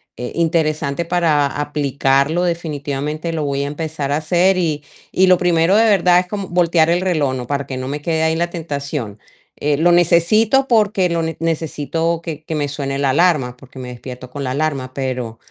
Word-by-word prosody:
eh, 125 0 -6
interesante 160 -2 0
para 165 -4 +2
aplicarlo. 145 +2 0
Definitivamente, 155 -1 -3
lo 160 -2 -2
voy 140 -1 -1
a - - -3
empezar 150 -1 -4
a - - +2
hacer, 175 +4 +2
y 155 -5 -1 0.3
y 190 0 +3
lo 185 -1 +6
primero 175 +1 +2
de 220 - +5
verdad, 180 -5 +4
es 180 - -10
como 200 -1 -4
voltear 170 -2 +2
el 175 +1 +2
reloj, 155 -8 0
¿no?, 125 -2 -5
para 140 0 -2
que 130 - -5
no 130 0 -4
me 145 +1 -4
quede 160 +1 0
ahí 160 0 +2
la 170 0 0
tentación, 140 - -5 0.4
eh, 145 0 +1
lo 175 +3 +4
necesito 210 +10 +3
porque 205 -5 +3
lo 170 0 0
ne 160 -1 -3
necesito 165 +1 -1
que 155 -2 -6
que 160 - -3
me 145 -1 -1
suene 140 -1 -3
la 140 -1 +1
alarma, 145 -6 +2
porque 130 0 -16
me 125 -1 -6
despierto 125 0 -9
con 145 - -5
la 130 - -2
alarma, 135 -2 -2
pero 125 -4 -4
155 Hz, 195 wpm, -18 LUFS, 140-170 Hz, 0.4 s, lo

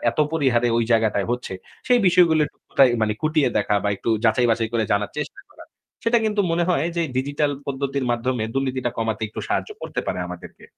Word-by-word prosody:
এত - - -13
পরিহারে 125 -6 +2
ওই 115 - +2
জায়গাটায় 110 -3 +2
হচ্ছে 120 -5 -3 0.4
সেই 245 -1 +5
বিষয়গুলো 165 -3 +5 0.3
কোথায় 135 -2 +5 0.3
কুঁটিয়ে 155 -3 +2
দেখা 105 0 0
বা - - +2
একটু 115 - -2
যাচাই 115 +2 +3
বাছাই 115 0 0
করে 115 -2 +1
জানার 100 0 0
চেষ্টা 270 - -5
করা। - - -14 0.4
সেটা 235 +1 +4
কিন্তু 210 -1 +1
মনে 170 +1 +1
হয় 160 -2 +1
যে 170 - +2
ডিজিটাল 145 +2 0 0.2
পদ্ধতির 140 -1 -2
মাধ্যমে 120 -1 -1
দুর্নীতিটা 130 -2 -1
কমাতে 110 -1 -2
একটু - - -7
সাহায্য - - -1
করতে - - -3
পারে - - -2
আমাদেরকে। 90 0 -10
130 Hz, 185 wpm, -22 LUFS, 115-155 Hz, 0.4 s, সেই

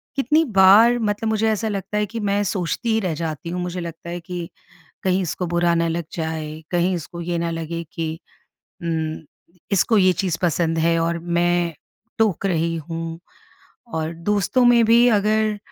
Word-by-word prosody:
कितनी 290 +4 +3 0.2
बार 225 +6 +7
मतलब 215 0 -1
मुझे 220 0 +1
ऐसा 220 +1 -1
लगता 200 0 -3
है 210 - +1
कि 230 - -3
मैं 205 -1 0
सोचती 190 +5 -2
ही 220 - +2
रह 185 -6 -1
जाती 160 0 -4
हूँ, 180 +1 -3
मुझे 180 0 -4
लगता 170 0 -7
है 175 +1 -4
कि 175 0 -6 0.5
कहीं 190 0 +1
इसको 180 +1 -3
बुरा 175 0 +2
ना 170 0 +1
लग 165 +1 -2
जाए, 160 -1 -4
कहीं 175 +1 +1
इसको 170 0 -6
ये 170 0 -2
ना 170 - -1
लगे 165 0 -4
कि, 160 -1 -4 0.7
उम, 160 -1 -2 0.5
इसको 210 +3 +3
ये 185 -2 +5
चीज़ 175 -1 -1
पसंद 165 -1 +1
है 165 +1 +2
और 165 +1 0
मैं 175 0 +1 0.4
टोक 215 -5 +1
रही 165 -3 0
हूँ 165 0 -5 0.7
और 160 0 -2
दोस्तों 205 +8 +1
में 240 -1 +6
भी 235 +2 +5
अगर 215 +1 +1
175 Hz, 175 wpm, -22 LUFS, 165-205 Hz, 0.7 s, बार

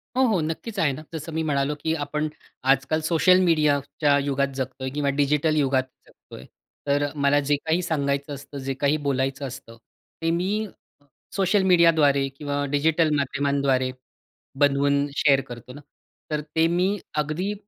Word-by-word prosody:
हो, 260 - +2
हो. 210 -6 +2
नक्कीचं 195 +7 -4
आहे 150 - +3
ना, 130 - -8
जसं 160 0 -6
मी 160 0 -1
म्हणालो, 145 -1 0
की 160 - +1
आपण 150 +2 -2 0.5
आजकाल 135 +4 -1
सोशल 180 +2 +5
मीडियाच्या 150 -3 +2
युगात 140 0 0
जगतो 130 0 -5
आहे 130 - -3
किंवा 145 -1 0
डिजिटल 150 +2 +2
युगात 135 -3 +2 0.2
जगतो - - -16
आहे. 65 - -11 0.4
तर 145 +1 +2
अ, 145 - 0
मला 140 0 +3
जे 145 +1 +1
काही 160 +3 +1
सांगायचं 140 -3 -1
असतं, 140 +1 -9
जे 135 0 -3
काही 140 +3 +1
बोलायचं 135 +1 -1
असतं, 120 -3 -10 0.4
ते 165 0 +1
मी 195 +6 -1
अ, - - -10 0.7
सोशल 195 +1 +2
मीडियाद्वारे 160 -6 +4
किंवा 145 -1 -2
डिजिटल 155 +2 +2
माध्यमांद्वारे 140 -2 0 0.7
बनवून 140 0 +3
शेअर 135 -2 +4
करतो 120 +1 -10
ना. 145 - -11 0.5
तर 150 -1 0
ते 160 0 +4
मी 180 +4 +1 0.2
अगदी 155 +7 -1
145 Hz, 165 wpm, -24 LUFS, 140-160 Hz, 0.7 s, सोशल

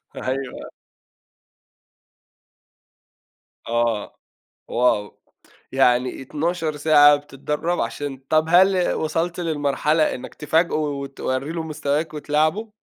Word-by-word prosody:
أيوه. 130 0 -4 3.0
آه. 115 -2 -1 0.5
wow! 115 -4 +1 0.6
يعني 125 -1 +2
12 155 +3 -2
ساعة 145 -1 +6
بتتدرّب 150 +4 -3
عشان 135 +4 -3
طَب 155 0 +3
هل 185 +1 +4
وصلت 165 +3 -2
للمرحلة 155 -1 +1
إنك 125 - -9
تفاجئه 160 +3 +1
وتورّي 140 -1 -3
له 165 -1 -3
مستواك 150 0 -2
وتلاعبه؟ 155 +9 0
150 Hz, 85 wpm, -22 LUFS, 135-160 Hz, 3.0 s, ساعة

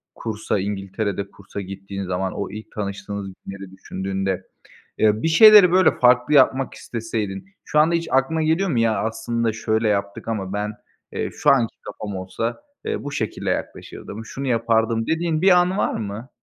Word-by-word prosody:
kursa, 110 -2 -2
İngiltere'de 100 0 -3
kursa 100 0 -8
gittiğin 100 +1 -6
zaman, 95 0 -2
o 100 - -4
ilk 110 +2 -9
tanıştığınız 100 -1 -5 0.2
günleri 95 -1 -8
düşündüğünde, 95 0 -3 0.5
eee, 110 0 +3
bir - - +2
şeyleri, 205 +1 +8
böyle, 185 +1 +5
farklı 125 +3 +4
yapmak 135 -1 +4
isteseydin 110 - -4 0.2
şu 150 - +1
anda 160 +3 +4
hiç 170 -1 -2
aklına 135 +5 +2
geliyor 165 +5 +1
mu? 125 - +1
Ya, 110 -3 +2
aslında, 115 0 -1
"Şöyle 110 0 0
yaptık 100 0 -2
ama 100 -4 -3
ben, 105 +1 -2 0.4
eee, - - -3
şu - - +2
anki 120 -5 +3
kafam 105 -2 -7
olsa, 95 - -4 0.2
eee, - - -2
bu 145 - -5
şekilde 110 -6 -3
yaklaşırdım, 110 +2 -5
şunu 135 +4 -5
yapardım." 115 -1 +1
dediğin 160 -1 0
bir 190 - +5
an 180 +2 +1
var - - +1
mı? 110 +4 -5
110 Hz, 165 wpm, -22 LUFS, 100-135 Hz, 0.5 s, şeyleri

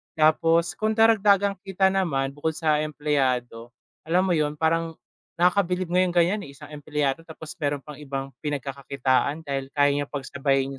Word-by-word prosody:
Tapos 165 +2 +3
kung 215 0 0
karagdagang 200 -3 +4
kita 190 0 +1
naman, 140 -8 0
bukod 150 +2 -3
sa 155 -2 +1
empleyado, 130 -6 -1 0.4
alam 180 +3 +3
mo 190 - 0
yun, 150 -2 +1
parang 165 +1 0 0.4
nakakabilib 180 0 +1
nga 180 - +3
yung 180 -1 +1
ganiyan, 175 +5 +3
eh, 140 - -13
isang 150 +1 -13
empleyado 145 -1 -2
tapos 160 -1 -9
meron 145 -2 -2
pang 150 -1 -10
ibang 135 -1 -5
pinagkakakitaan 140 +1 -1
dahil 135 -2 -3
kaya 145 -1 +4
niyang 145 0 -1
pagsabayin 135 -1 -1
150 Hz, 155 wpm, -25 LUFS, 140-175 Hz, 0.4 s, karagdagang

